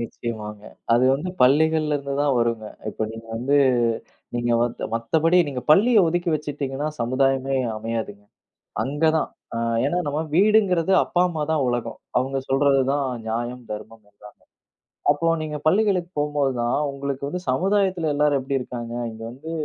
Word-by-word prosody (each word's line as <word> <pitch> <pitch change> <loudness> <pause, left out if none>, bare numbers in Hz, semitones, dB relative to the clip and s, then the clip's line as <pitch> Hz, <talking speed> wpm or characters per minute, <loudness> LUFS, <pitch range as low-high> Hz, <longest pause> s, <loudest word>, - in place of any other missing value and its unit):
நிச்சயமாங்க, 110 -3 -6 0.3
அது 120 +2 +4
வந்து, 160 +7 -4
பள்ளிகள்ல 155 +2 +3
இருந்து 140 -1 -4
தான் 145 -2 +2
வரும்ங்க. 115 -2 0 0.2
இப்ப, 110 - -3
நீங்க 115 0 -10
வந்து, 135 +5 +1 0.8
நீங்க 120 0 -1
மத் 120 -1 -3
மத்தபடி 160 +10 +2
நீங்க 125 -3 -4
பள்ளிய 210 +6 +6
ஒதுக்கி 175 0 0
வச்சிட்டீங்கன்னா, 145 -1 -3
சமுதாயமே 135 +2 +1 0.2
அமையாதுங்க. 110 -2 -5 0.6
அங்க 145 +4 -1
தான் - - 0 0.3
அ - - -1 0.3
ஏன்னா 175 - 0
நம்ம 145 +1 -1
வீடுங்கிறது, 195 -2 +3
அப்பா 175 - 0
அம்மா 160 -3 -4
தான் 155 -4 +1
உலகம். 120 -1 -2 0.2
அவங்க 135 +2 0
சொல்றது 135 0 +3
தான் 145 0 0 0.2
நியாயம், 120 +2 -3
தர்மம் 110 +1 -8
எல்லாமே. 105 +1 -14 0.8
அப்போ, 155 +3 +1
நீங்க 150 -1 -4
பள்ளிகளுக்கு 185 -1 +2
போம்போது 145 -2 +1
தான், 120 +1 +1 0.2
உங்களுக்கு 140 0 -4
வந்து, 180 +5 -4
சமுதாயத்துல 185 +1 +1
எல்லாரும் 145 -1 +2
எப்படி 135 +1 -1
இருக்காங்க, 120 -2 -6 0.2
இங்கே 110 0 -9
வந்து 140 +7 -9
140 Hz, 145 wpm, -23 LUFS, 120-160 Hz, 0.8 s, பள்ளிய